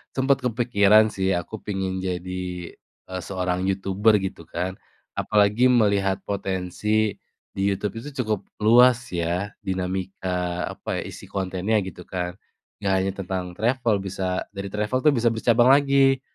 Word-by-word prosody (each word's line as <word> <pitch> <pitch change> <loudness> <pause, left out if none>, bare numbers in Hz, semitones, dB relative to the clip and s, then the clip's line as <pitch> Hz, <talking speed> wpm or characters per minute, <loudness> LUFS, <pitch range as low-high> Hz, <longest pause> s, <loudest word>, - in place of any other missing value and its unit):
sempet 135 +1 +3
kepikiran 110 -3 +4
sih, 95 -2 0
aku 95 +5 -4
pengen 95 -2 -2
jadi, 90 0 -3 0.7
eee, 95 0 -4
seorang 90 -1 -1
youtuber 95 +3 +2
gitu 95 -4 -6
kan, 90 +3 -3 0.4
apalagi 105 +4 +3
melihat 100 -5 +2
potensi 100 +2 -1 0.4
di 95 - -5
YouTube 100 +3 -2
itu 145 +3 -9
cukup 105 -3 -2 0.2
luas 125 +2 +5
ya, 90 +4 -1
dinamika 90 -1 -3
apa, - - -4
isi - - -10
kontennya 95 +2 -1
gitu 90 -1 -9
kan, 90 0 -4 0.4
enggak 100 -2 0
hanya 95 - 0
tentang 95 -1 -2
travel, 115 +1 +1
bisa 95 -1 -3
dari 100 0 -5
travel 105 +5 -1
tuh 150 - +6
bisa 120 -3 +1
bercabang 115 +1 +3
lagi 135 -1 +3
100 Hz, 135 wpm, -24 LUFS, 95-110 Hz, 0.7 s, tuh